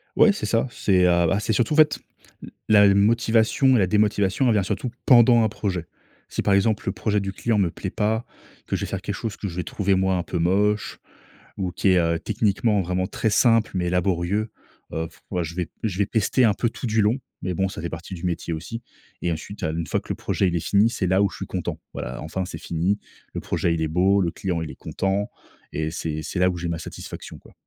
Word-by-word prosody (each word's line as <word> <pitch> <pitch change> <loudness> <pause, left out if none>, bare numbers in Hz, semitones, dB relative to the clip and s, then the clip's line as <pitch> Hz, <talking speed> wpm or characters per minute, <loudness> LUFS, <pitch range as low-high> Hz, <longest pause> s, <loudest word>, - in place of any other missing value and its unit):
Ouais, 215 - +6
c'est 205 - -4
ça, 115 +3 +1
c'est, 95 -8 +2
heu, - - +5 0.2
ah 100 - +2
c'est 110 - -1
surtout 120 +6 +1
en - - 0
fait 155 -1 +5 0.4
l - - -8 0.2
la 105 -2 +7
motivation 115 +5 +3
et - - +4
la 95 - +3
démotivation 105 +3 +2
elle 120 - +4
vient 105 -2 +2
surtout 125 +6 -2 0.2
pendant 120 -2 +7
un 110 - +2
projet. 95 -5 -3 0.4
Si - - -2
par 100 - +2
exemple 105 +2 +2
le - - +2
projet 105 +1 0
du 95 -1 -4
client 115 +3 0
me 95 -4 +2
plaît - - -5
pas, 110 +2 0 0.4
que - - -2
je - - -3
vais - - -7
faire 95 - -3
quelque 100 -2 -4
chose 110 -1 -5
que 100 - -4
je 85 - -7
vais 90 - -2
trouver 100 +1 0
moi 95 0 +2
un 90 - -1
peu 90 - -4
moche 105 +5 +1 0.6
ou 95 -2 -2
qui 95 - +1
est, 90 -1 +5
heu, 85 -1 +1
techniquement 105 0 +1
vraiment 90 +1 -1
très 110 - -1
simple 115 +1 +3
mais 90 -1 0
laborieux, 90 +4 0 0.4
heu, 80 0 -2 0.4
je 80 0 -7
vais 90 -2 -3
je 100 -5 -2
vais 100 - +3
pester 115 +4 +2
un 105 - +4
peu 120 - 0
tout 120 - -6
du 110 0 +2
long 105 +5 +2 0.3
mais 90 - -1
bon 95 +2 0
ça 95 - -7
fait 85 - -3
partie 85 +4 -7
du 85 - -10
métier 85 -1 -2
aussi 115 +9 -6 0.4
et 85 - 0
ensuite, 85 +6 -6
heu, 80 - 0
une 85 - -3
fois - - 0
que - - -18
le - - -1
projet 95 - 0
il 85 - -1
est - - +1
fini, 105 +3 +4
c'est 100 -5 -2
là 95 +2 +3
où 100 - +2
je - - -11
suis - - -5
content. - - -4
Voilà, 60 - -5
enfin, 80 +5 -3
c'est 85 - -7
fini. 85 +5 -1 0.4
Le - - -4
projet, 85 - 0
il 80 - -2
est 80 - +1
beau, 95 +5 +3
le 85 -2 0
client 90 -2 -3
il 80 - -6
est - - -11
content 95 +1 -2 0.4
et 80 +1 -2
c'est 80 -2 -3
c'est 90 - -4
là 90 0 +4
où 90 - -3
j'ai 85 0 -3
ma 85 -1 -3
satisfaction - - -8
quoi. - - -19
95 Hz, 250 wpm, -24 LUFS, 90-110 Hz, 0.6 s, la